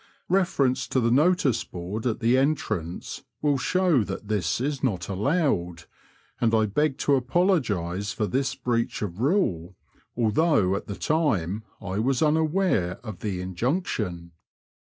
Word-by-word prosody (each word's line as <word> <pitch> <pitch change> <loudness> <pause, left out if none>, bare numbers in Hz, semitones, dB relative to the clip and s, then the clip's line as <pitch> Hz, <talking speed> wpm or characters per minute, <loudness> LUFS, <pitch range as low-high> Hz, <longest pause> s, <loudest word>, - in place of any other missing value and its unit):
(Reference 170 -9 +1
to 130 - +1
the 115 -1 +2
notice 145 -4 +3
board 95 +7 -5
at 120 +1 -2
the 115 +2 +3
entrance 110 - -1 0.2
will 145 -2 +1
show 180 - +2
that 100 +1 -6
this 95 -5 0
is 140 +1 -2
not 95 -9 -1
allowed, 100 - 0 0.6
and 115 -1 +2
I 110 -1 +3
beg 135 +7 0
to 145 - +4
apologise 125 - +1
for 110 - -1
this 135 +7 -1
breach 120 -4 -1
of 95 -2 -5
rule, 100 - 0 0.4
although 115 - +2
at - - -5
the 100 - -4
time 110 - 0 0.2
1 100 +2 -3
was 135 +2 +1
unaware 155 - +1
of 105 -6 -7
the 95 -3 -3
injunction.) 95 - -2
115 Hz, 140 wpm, -25 LUFS, 95-145 Hz, 0.6 s, to